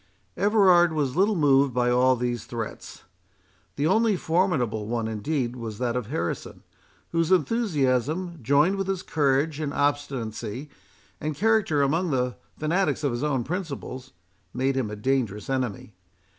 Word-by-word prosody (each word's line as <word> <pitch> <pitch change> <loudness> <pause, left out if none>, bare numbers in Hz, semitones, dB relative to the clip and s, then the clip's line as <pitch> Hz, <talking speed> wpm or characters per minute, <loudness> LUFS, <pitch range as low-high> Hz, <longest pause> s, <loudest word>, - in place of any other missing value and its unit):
Everard 185 -5 +4
was 145 -4 -1
little 200 +4 +3
moved 140 -5 +3
by 125 0 +2
all 130 +1 +4
these 120 -2 -3
threats. 115 -3 -7 0.7
The 145 - -1
only 220 +4 +3
formidable 155 - 0
one, 115 -1 -1
indeed, 120 +3 -2
was 115 -4 -6
that 120 0 -1
of 125 -4 -2
Harrison, 85 -3 -4 0.5
whose 165 +1 +1
enthusiasm, 170 - +1
joined 145 - +3
with 195 -1 -2
his 190 -2 -2
courage, 145 0 +1
and 150 -2 -2
obstinacy, 135 -3 -2 0.5
and 150 0 -3
character 200 -6 +2
among 165 +6 +1
the 125 -3 0 0.2
fanatics 155 -1 0
of 140 - +1
his 120 +1 -3
own 135 -5 0
principles, 140 -6 -5 0.4
made 135 +1 +1
him 130 -5 -1
a 105 - -5
dangerous 110 -2 -1
enemy. 125 -6 -3
140 Hz, 145 wpm, -25 LUFS, 125-165 Hz, 0.7 s, Everard